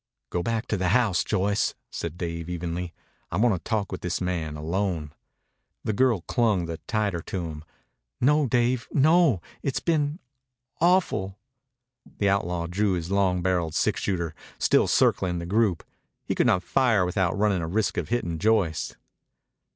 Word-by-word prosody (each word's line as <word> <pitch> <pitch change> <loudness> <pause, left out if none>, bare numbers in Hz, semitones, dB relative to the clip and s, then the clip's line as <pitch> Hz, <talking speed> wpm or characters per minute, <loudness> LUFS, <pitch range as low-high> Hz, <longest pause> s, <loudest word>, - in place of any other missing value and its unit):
"Go 90 - 0
back 115 +4 -1
to 105 - +1
the 95 0 0
house, 100 -9 +1
Joyce," 100 +2 0 0.2
said 85 0 -5
Dave 85 -1 -4
evenly. 85 0 -3 0.4
"I 85 - -1
want 115 +2 +4
to 90 - -2
talk 105 +2 -2
with - - -5
this 90 -1 -2
man 85 -4 -2
alone." 80 -1 -2 0.7
The 110 - -1
girl 120 -3 +2
clung 105 -4 +1
the 85 -1 -5
tighter 105 -6 0
to 90 +1 -4
him. 75 -2 -7 0.6
"No, 150 +3 +3
Dave, 120 +1 +1
no! 150 - +4 0.2
It's 135 - -1
been... 150 -2 0 0.6
awful." 170 - +2 0.8
The 100 - +2
outlaw 90 -3 0
drew 95 +3 0
his 85 0 -3
long 95 -3 +2
barreled 85 -4 0
six - - +1
shooter, 85 -5 -1 0.2
still - - +3
circling 90 -2 +2
the 85 - -4
group. 100 -1 +1 0.4
He - - -1
could - - +2
not 90 0 +3
fire 115 -7 +2
without 90 0 0
running 100 -3 +2
a 80 - -3
risk 105 +5 0
of - - -2
hitting 85 -9 -1
Joyce. 100 -6 +1
95 Hz, 160 wpm, -26 LUFS, 85-110 Hz, 0.8 s, want